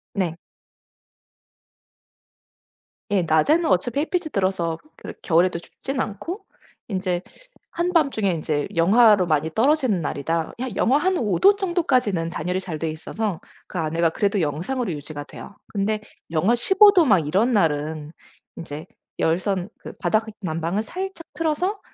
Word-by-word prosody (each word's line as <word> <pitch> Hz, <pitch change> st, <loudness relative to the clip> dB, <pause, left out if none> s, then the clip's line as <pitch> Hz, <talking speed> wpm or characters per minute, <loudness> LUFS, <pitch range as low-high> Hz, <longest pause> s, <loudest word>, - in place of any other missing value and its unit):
네. 180 Hz, -5 st, 0 dB, 2.8 s
예. 195 Hz, -3 st, +3 dB
낮에는 170 Hz, -, +3 dB
어차피 225 Hz, +9 st, +1 dB
햇빛이 345 Hz, +2 st, -1 dB
들어서 185 Hz, -4 st, 0 dB, 0.2 s
그러 -, -, -8 dB
겨울에도 170 Hz, +1 st, +2 dB
춥지는 265 Hz, +9 st, -6 dB
않고 335 Hz, -, -5 dB, 0.4 s
인제 185 Hz, -3 st, -1 dB, 0.5 s
한밤중에 315 Hz, -, +1 dB
인제 155 Hz, -3 st, -1 dB
영하로 205 Hz, +3 st, +5 dB
많이 155 Hz, -1 st, +1 dB
떨어지는 255 Hz, -, +2 dB
날이다, 160 Hz, +2 st, -2 dB
한 250 Hz, -5 st, -4 dB
영하 265 Hz, +4 st, +3 dB
한 370 Hz, +5 st, +1 dB
5 210 Hz, -, 0 dB
도 400 Hz, +1 st, +6 dB
정도까지는 260 Hz, -, 0 dB
단열이 180 Hz, +2 st, -2 dB
잘 180 Hz, -4 st, -5 dB
되어 160 Hz, -, -1 dB
있어서 180 Hz, +4 st, -4 dB, 0.3 s
그 -, -, -7 dB
안에가 165 Hz, +1 st, +1 dB
그래도 200 Hz, +2 st, 0 dB
영상으로 180 Hz, -, -2 dB
유지가 145 Hz, -1 st, -6 dB
돼요. 200 Hz, -, -11 dB
근데 210 Hz, +1 st, -1 dB, 0.3 s
영하 180 Hz, +9 st, +3 dB
15 385 Hz, -, +6 dB
도 355 Hz, -5 st, +5 dB
막 205 Hz, -9 st, +5 dB
이런 205 Hz, +11 st, +2 dB
날은 155 Hz, -6 st, 0 dB, 0.5 s
인제 155 Hz, -1 st, -7 dB, 0.3 s
열선 185 Hz, +3 st, 0 dB
그 -, -, -9 dB
바닥 215 Hz, +1 st, +1 dB, 0.2 s
난방을 170 Hz, +2 st, -1 dB
살짝 375 Hz, +4 st, -6 dB
틀어서 330 Hz, +6 st, -1 dB
195 Hz, 285 characters per minute, -23 LUFS, 165-260 Hz, 2.8 s, 도